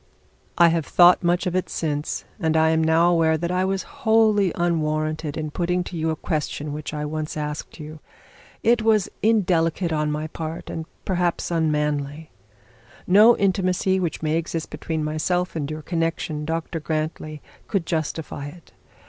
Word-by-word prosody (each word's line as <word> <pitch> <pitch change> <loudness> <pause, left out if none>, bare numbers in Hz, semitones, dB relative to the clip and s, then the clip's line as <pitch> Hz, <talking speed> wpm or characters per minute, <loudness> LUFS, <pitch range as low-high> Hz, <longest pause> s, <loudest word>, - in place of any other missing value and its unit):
'I 170 0 +7
have 165 -2 0
thought 175 0 +6
much 175 +2 +1
of 180 -1 -1
it 185 - -1
since, 150 -2 -3
and 160 -3 +1
I 160 0 +4
am 160 0 +2
now 165 +2 +4
aware 160 -2 +3
that 170 +2 -2
I 180 +1 +1
was 190 0 -1 0.2
wholly 220 -4 +4
unwarranted 155 -2 -1
in 155 -1 -3
putting 180 +2 0
to 175 - -8
you 160 0 -1
a 160 - 0
question 150 -2 -3
which 150 0 -5
I 150 -1 -3
once 155 +1 -4
asked 150 +2 -5
you. 155 0 -8 0.6
It 235 0 +4
was 215 -3 +2
indelicate 180 -6 +2
on 150 -1 0
my 150 +1 -2
part, 160 +1 -6
and 160 0 -5 0.2
perhaps 175 -2 -1
unmanly. 150 -2 -1 0.7
No 210 +6 +6
intimacy 190 -1 +1
which 170 -3 -3
may 155 +1 +1
exist 165 -1 -4
between 155 +1 -3
myself 175 +4 -1
and 150 -3 -2
your 155 0 -6
connection, 165 -2 -2
Dr 165 +1 -3
Grantly, 155 0 -3 0.3
could 195 -5 -1
justify 155 -3 -3
it. 165 +3 -13
160 Hz, 165 wpm, -23 LUFS, 155-180 Hz, 0.7 s, I